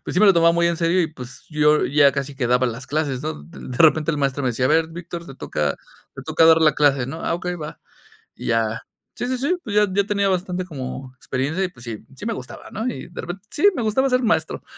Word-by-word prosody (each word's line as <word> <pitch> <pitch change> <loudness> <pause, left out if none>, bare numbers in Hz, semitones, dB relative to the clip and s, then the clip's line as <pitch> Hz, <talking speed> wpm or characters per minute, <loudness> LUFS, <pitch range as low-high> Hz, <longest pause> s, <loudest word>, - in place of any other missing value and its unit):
pues - - -5
sí 180 - +3
me 215 - +7
lo 195 - +8
tomaba 170 -1 +4
muy 170 0 +2
en 170 0 +1
serio 170 +2 +2
y, 165 - +1
pues, 125 -3 -10
yo 150 0 +3
ya 145 0 +5
casi 140 0 -4
que 135 -2 -1
daba 125 +1 +3
las 125 +2 -5
clases, 145 -4 -1
¿no? 155 - -4
D 80 - -14
de 125 - -7
repente 155 0 +5
el 155 - -2
maestro 140 -1 -1
me 130 - +1
decía: 125 +1 -1
"A - - +3
ver, 160 +1 +3
Víctor, 170 +1 -7
te 135 - -10
toca 75 - -2 0.4
te - - -8
toca 160 - +3
dar 160 0 +7
la 155 -1 +5
clase", 140 -4 +3
¿no? 160 +4 -6
"Ah, - - 0
ok, 175 +1 -6
va." 150 0 -7 0.6
Y - - -9
ya 115 0 0 0.3
sí, - - -3
sí, 255 0 -1
sí, 290 +8 +1
pues 205 -5 -5
ya 210 0 +5
ya 200 +2 +2
tenía 200 -1 +1
bastante 185 0 -1
como 130 -5 -7
experiencia 135 +8 -2
y, - - +1
pues, 120 -9 -16
sí, 115 -2 -5 0.2
sí 170 - -9
me 230 - -1
gustaba, 125 -9 -9
¿no? 225 +4 -3
Y 245 - -5
de 175 - -7
repen 175 +3 -6
sí, 325 - +3
me 245 - -2
gustaba 225 +5 +2
ser 250 0 +2
maestro. 225 - 0
155 Hz, 270 wpm, -22 LUFS, 130-185 Hz, 0.6 s, lo